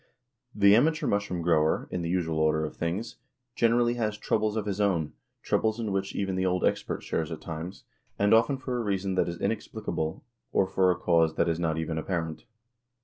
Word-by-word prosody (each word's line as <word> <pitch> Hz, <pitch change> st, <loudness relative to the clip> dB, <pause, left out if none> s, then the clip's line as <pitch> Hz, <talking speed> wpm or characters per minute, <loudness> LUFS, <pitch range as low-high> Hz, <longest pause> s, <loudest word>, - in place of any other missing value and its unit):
The 100 Hz, -1 st, +6 dB
amateur 155 Hz, +7 st, +2 dB
mushroom 100 Hz, -4 st, -1 dB
grower, 80 Hz, -2 st, +2 dB
in 90 Hz, -, -2 dB
the 85 Hz, -, -3 dB
usual 85 Hz, -3 st, 0 dB
order 80 Hz, 0 st, +2 dB
of -, -, -7 dB
things, 90 Hz, +7 st, -3 dB, 0.4 s
generally 120 Hz, +1 st, +3 dB
has 105 Hz, -1 st, -1 dB
"troubles 110 Hz, 0 st, 0 dB
of 110 Hz, -2 st, -1 dB
his 100 Hz, 0 st, -2 dB
own," 85 Hz, -7 st, +1 dB, 0.3 s
troubles 110 Hz, +1 st, +1 dB
in 110 Hz, -3 st, -2 dB
which 95 Hz, 0 st, -2 dB
even 95 Hz, -1 st, -1 dB
the 95 Hz, -, 0 dB
old 90 Hz, 0 st, +1 dB
expert -, -, -1 dB
shares 80 Hz, -1 st, -2 dB
at 80 Hz, -, -5 dB
times, 85 Hz, +3 st, -7 dB, 0.3 s
and 100 Hz, +1 st, +3 dB
often 115 Hz, +5 st, +4 dB
for 130 Hz, -1 st, -3 dB
a -, -, -1 dB
reason 100 Hz, -2 st, -1 dB
that 95 Hz, -, +1 dB
is 85 Hz, -, -6 dB
inexplicable, 80 Hz, +3 st, -3 dB, 0.3 s
or 95 Hz, -, +3 dB
for 95 Hz, 0 st, +2 dB
a 90 Hz, -, +2 dB
cause 85 Hz, -3 st, +2 dB
that -, -, +2 dB
is 85 Hz, 0 st, 0 dB
not 80 Hz, -2 st, 0 dB
even 80 Hz, 0 st, -2 dB
apparent. 80 Hz, -2 st, -3 dB
95 Hz, 200 wpm, -28 LUFS, 80-105 Hz, 0.4 s, The